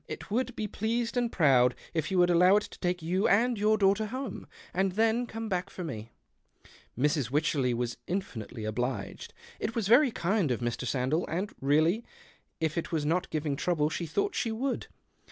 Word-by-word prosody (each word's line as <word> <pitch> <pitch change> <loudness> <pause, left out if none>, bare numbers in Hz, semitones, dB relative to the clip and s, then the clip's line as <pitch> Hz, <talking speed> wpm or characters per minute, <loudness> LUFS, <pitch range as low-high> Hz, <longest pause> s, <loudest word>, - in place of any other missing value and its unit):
It - - -8
would 250 +2 0
be 215 - -2
pleased 230 +4 -2
and 240 -1 +1
proud 130 -6 +4 0.2
if 160 -3 -1
you 190 - 0
would 175 0 +5
allow 180 +3 +6
it 210 - +3
to - - -11
take 180 -2 -1
you 185 +5 +1
and 240 +4 +3
your 215 +1 +2
daughter 200 +1 +3
home, 255 -1 -5 0.3
and 190 +1 +1
then 225 +3 +2
come 225 0 -5
])ack 180 0 -2
for 185 - -7
me." 115 -8 -6 0.9
Mrs. 145 -1 +1
Wycherley 140 -3 +1
w^as 120 0 -2
infinitely 120 - -4
obliged. 120 0 -3 0.3
It 220 - -3
was 225 -4 0
very 255 +6 +6
kind 195 - 0
of 125 - 0
Mr. 120 +1 -2
Sandell, 135 +6 0
and 185 +6 -3
really 155 - +3 0.6
if 160 0 0
it - - -6
was 155 -3 0
not 175 +4 0
giving 150 -2 -1
trouble 155 0 0
she 170 - -3
thought 405 - 0
she 225 - -1
would. 255 +4 -2
180 Hz, 190 wpm, -29 LUFS, 145-220 Hz, 0.9 s, allow